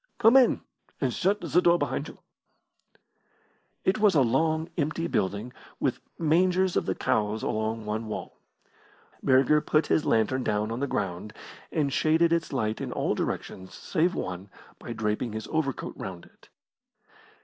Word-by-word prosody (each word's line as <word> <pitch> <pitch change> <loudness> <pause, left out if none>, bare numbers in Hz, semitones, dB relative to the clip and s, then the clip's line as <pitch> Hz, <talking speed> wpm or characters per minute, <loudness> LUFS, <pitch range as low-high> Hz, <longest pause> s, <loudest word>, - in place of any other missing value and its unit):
Come 225 +3 +5
in, 265 -2 +5 0.4
and - - 0
shut 200 +2 +1
the 180 - +2
door 175 0 +5
behind - - -2
you." - - -11 1.7
It 190 +3 +2
was 210 -4 +4
a 140 - +5
long, 160 +6 +1
empty 155 +1 -1
building, 105 - -1 0.3
with - - 0 0.2
the - - -7
mangers 180 +3 +3
of - - 0
the - - 0
cows 105 0 0
along 110 0 -2
one 110 +1 -3
wall. 105 - -6 0.8
Burger 135 +3 +4
put 155 +1 +2
his 155 - +2
lantern 115 +4 +1
down 105 0 0
on 115 - -3
the 140 - -1
ground, 100 -2 -3 0.4
and 140 -3 0
shaded 165 +1 +3
its 170 0 -1
light 110 -5 -1
in - - -4
all - - 0
directions 95 0 -4
save 175 +1 0
one 90 +2 -5 0.3
by - - -8
draping 110 +1 -2
his 110 0 -5
overcoat 155 -5 -2
round 90 -2 -7
it. - - -23
135 Hz, 160 wpm, -27 LUFS, 110-165 Hz, 1.7 s, Come